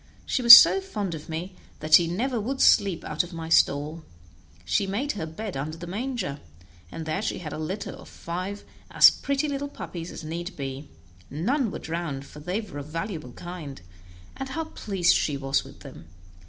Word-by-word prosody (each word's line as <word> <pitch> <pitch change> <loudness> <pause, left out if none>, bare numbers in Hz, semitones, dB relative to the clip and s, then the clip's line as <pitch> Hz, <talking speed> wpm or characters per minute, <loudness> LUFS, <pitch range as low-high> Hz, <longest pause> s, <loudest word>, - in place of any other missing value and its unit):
She - - -1
was 235 0 +13
so 390 - +5
fond 210 - -4
of 155 0 -9
me 170 +4 -5 0.3
that 155 0 -4
she 170 0 +8
never 230 +7 -2
would 265 +5 -3
sleep 195 -4 +4
out - - -1
of 175 0 -11
my 165 -1 -6
stall; 155 +1 +2 0.6
she 90 - 0
made 230 +9 -2
her 165 -6 -5
bed 195 +5 -6
under 150 +4 -4
the 175 - -8
manger, 210 - -4 0.5
and 160 - -6
there 155 +4 -2
she - - -2
had 155 -4 -7
a - - -6
litter 185 +7 -4
of - - -12
five 185 +4 -6 0.3
as - - +8
pretty 280 +2 -2
little 285 0 -3
puppies 170 -10 -7
as - - -9
need 170 +4 -6
be; 135 +1 -6 0.4
none 230 - 0
were - - -5
drowned, 160 -5 -5
for 150 - -13
they 180 +7 -3
were 200 -9 -9
a - - -6
valuable 160 - -6
kind, 170 - -8 0.5
and 270 0 -6
how 325 +4 -3
pleased 195 - 0
she 145 -2 0
was 135 0 0
with - - -15
them! 80 - -12
175 Hz, 195 wpm, -26 LUFS, 155-215 Hz, 0.6 s, was